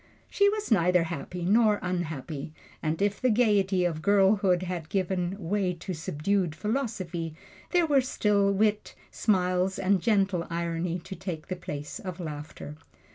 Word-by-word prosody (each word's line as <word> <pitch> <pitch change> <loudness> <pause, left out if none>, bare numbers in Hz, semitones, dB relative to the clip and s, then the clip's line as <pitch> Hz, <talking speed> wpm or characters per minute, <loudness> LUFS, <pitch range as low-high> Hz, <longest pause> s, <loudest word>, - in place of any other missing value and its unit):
She 405 0 +4
was 425 - -3
neither 180 -3 +4
happy 170 +2 -5
nor 215 +2 +4
unhappy, 160 -4 -4 0.3
and 155 0 -1
if 205 0 0
the 255 - +3
gaiety 205 -5 +3
of 160 -3 -1
girlhood 195 -1 +3
had 175 -3 -4
given 185 -1 -1
way 190 -1 -1
to 185 +2 -6
subdued 175 +1 -1
philosophy, 185 - -3 0.3
there 355 -2 +3
were 285 -4 +4
still 205 -5 +2
wit, 210 +1 0 0.2
smiles 185 -2 +1
and 190 -1 +2
gentle 195 -5 +1
irony 170 +1 -2
to 190 +2 -8
take 170 -2 -6
the 185 - -2
place 150 0 -6
of 185 -6 -6
laughter. 150 -2 -7
185 Hz, 145 wpm, -28 LUFS, 170-205 Hz, 0.3 s, She